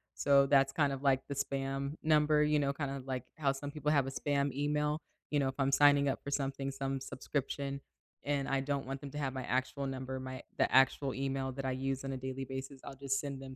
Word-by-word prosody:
So 140 -1 +5
that's 135 -1 +4
kind 145 -3 +2
of, 135 +1 -6
like, 135 -2 +4
the 140 - -4
spam 135 +1 -2
number, 150 -1 +4
you 150 0 +3
know, 140 -1 +1
kind 140 -1 -3
of, 135 -1 -6
like, 130 -2 -3
how 140 -3 +2
some 140 +1 -5
people 150 -1 -1
have 140 -3 +3
a - - -3
spam 140 0 0
email, 150 +2 0 0.3
you 145 - +2
know, 135 -1 +2
if 130 - -6
I'm 135 0 +2
signing 145 0 +6
up - - -2
for 140 - -5
something, 135 -1 -1
some 135 0 -2
subscription, 140 +1 -3 0.4
and 140 -1 0
I 135 -1 +1
don't 140 -1 -2
want 135 0 -4
them 140 -2 -7
to 150 - -7
have 135 -3 -1
my 130 -1 -4
actual 130 +3 -1
number, 130 0 -4
my 130 0 -6 0.2
the - - +2
actual 135 +1 +4
email 135 0 -2
that 135 +1 -5
I 130 - 0
use 135 +1 -2
on 135 0 -3
a - - -3
daily 130 +1 -4
basis, 135 +1 -6
I'll 135 - -8
just 135 0 -1
send 140 -2 -4
them 130 -1 -8
135 Hz, 245 wpm, -33 LUFS, 135-140 Hz, 0.4 s, signing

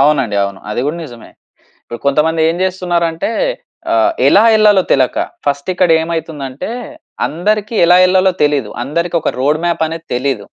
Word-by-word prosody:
అవునండి, 135 -7 +2
అవును. 100 -1 -6
అది 115 - -2
గూడా 155 +3 -2
నిజమే 120 -5 -12 0.5
ఇపుడు 120 - -8
కొంతమంది 160 +3 +1
ఏం 170 - -3
చేస్తున్నారు 180 -2 -1
అంటే 165 +7 -3 0.6
ఆహ్, 335 0 +3 0.2
ఎలా 205 - +5
ఏళ్ళాలో 210 -3 +4
తెలక, 130 -2 +2 0.3
ఫస్ట్ 140 +3 -2
ఇక్కడ 180 -1 +1
ఏమైతుంది 160 -3 -4
అంటే, 130 +11 -6 0.6
అందరికి 210 +7 -2
ఎలా 175 +1 +6
ఏళ్ళాలో 185 0 +3
తెలీదు. 145 -7 +1
అందరికి 170 +6 -2
ఒక - - -1
రోడ్ 145 +4 +1
మ్యాప్ 170 -1 0
అనేది 165 +1 -7
తెలీదు. 125 -4 -2
160 Hz, 160 wpm, -15 LUFS, 140-180 Hz, 0.6 s, ఎలా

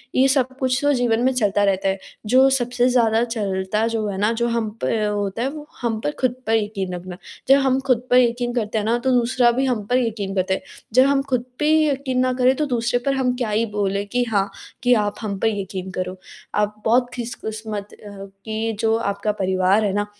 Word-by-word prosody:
ये 265 +1 +5
सब 260 -1 +1
कुछ 255 0 +1
तो 290 0 +3
जीवन 240 -3 +1
में 260 - +3
चलता 205 -4 +1
रहता 195 -1 +1
है। 190 0 -2 0.3
जो 260 +5 +5
सबसे 245 -1 +1
ज़्यादा 230 -2 +3
चलता 210 -2 -1
जो 225 -2 -1
है 200 -2 -4
ना 210 +3 +2
जो 235 +1 0
हम 230 -2 -1
पर 220 -2 0
होता 205 +1 -2
है 265 - 0
वो 300 0 -9
हम 225 -2 -1
पर 295 - +1
ख़ुद 250 -1 +1
पर 225 - +3
यकीन 205 -4 -2
रखना। 180 0 -8 0.3
जब 275 - +7
हम 265 -1 +2
ख़ुद 245 -3 +3
पर 250 - +5
यकीन 240 0 +2
करते 220 -2 -1
हैं 210 - -1
ना 235 +2 +2
तो 260 +1 0
दूसरा 240 0 +3
भी 260 +3 0
हम 235 -6 -1
पर 250 - +2
यकीन 210 -5 -2
करता 190 0 +1
है। - - -2 0.3
जब 255 +2 +6
हम 280 -1 +2
ख़ुद 250 -2 0
पे 300 - +1
ही 310 -1 +4
यकीन 270 -2 -1
ना 255 0 +2
करें 255 +1 +3
तो 300 - 0
दूसरे 245 -2 0
पर 275 - +2
हम 250 -2 0
क्या 240 -4 -2
ही 220 +2 +1
बोलें 200 0 0
कि 245 +4 0
हाँ, 200 -4 0 0.3
कि 245 0 +5
आप 210 -3 +1
हम 200 -3 -3
पर 225 - +1
यकीन 190 -3 -4
करो। 185 0 -4 0.4
आप 210 0 -1
बहुत 245 +2 +3
खुशकिस्मत 220 -3 -6
अ, 210 - -12 0.4
कि 220 - -6
ये 225 +1 -1
जो 225 0 +2
आपका 200 -1 -1
परिवार 190 +1 +1
है 195 - 0
ना, 205 +1 0
225 Hz, 230 wpm, -21 LUFS, 205-250 Hz, 0.4 s, जब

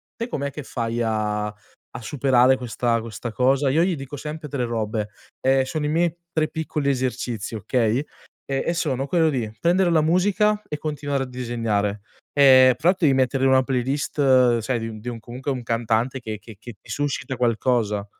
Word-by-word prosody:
te 230 +1 -4
com'è 140 - -3
che 145 +1 -8
fai 115 -2 -2
a 105 -1 -1
a 105 +3 -13
superare 130 0 +3
questa 120 -1 -1
questa 115 +1 -6
cosa?" 135 +4 +2
Io 160 +6 +3
gli 185 -1 +1
dico 135 0 -7
sempre 150 +2 -6
3 135 -4 -2
robe, 110 -2 -2 0.3
ehm, 135 0 +3
sono 150 +2 -3
i - - 0
miei 170 +1 +1 0.2
3 155 -1 +1
piccoli 155 -3 -2
esercizi, 125 -4 -2
okay, 110 +1 0 0.5
e 135 -1 -1
e 170 - +2
sono: 140 -5 -1
quello 165 -1 +3
di 120 -7 -2
prendere 175 +1 +3
la 160 -2 +4
musica 205 +6 +2
e 150 - -3
continuare 145 -3 -2
a - - -4
disegnare, 115 -5 -2 0.3
ehm, 130 -2 +7
fra 165 +3 +2
l'altro 180 -4 +2
devi 135 - +4
mettere 130 0 +1
in - - +5
una 130 0 +5
playlist, 130 -1 +2
sai 120 +2 -1
di 115 - -4
un 110 -1 -8
di 120 - -11
un 115 - -6
comunque 125 +5 -5
un 125 -2 -4
cantante, 115 +3 0
che 110 -2 -5
che 110 -4 -13
che 120 0 -9
ti - - -20
suscita 145 -2 -2
qualcosa. 115 -3 +1
130 Hz, 190 wpm, -23 LUFS, 115-145 Hz, 0.5 s, ehm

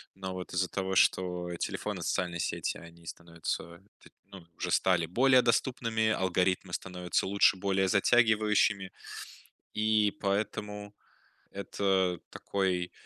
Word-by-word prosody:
Но, 95 -1 -5
вот, 90 -1 -7
из-за 90 +1 +1
того, 95 -1 -3
что 90 -2 +2
телефоны, - - -3
социальные 90 -2 -1
сети, - - -2
они 85 0 -14
становятся, 85 0 -6 0.2
т - - -16 0.2
ну, 95 -4 -13
уже - - -3
стали 90 -3 +3
более 130 +8 +4
доступными, 115 -2 +1
алгоритмы 95 -2 0
становятся 90 0 -2
лучше, 100 0 +4
более 95 0 +1
затягивающими, 105 -2 +3 0.8
и 105 -1 +2
поэтому 105 0 -2 0.6
это 95 -2 0
такой, 90 -3 -2
95 Hz, 115 wpm, -30 LUFS, 90-105 Hz, 0.8 s, более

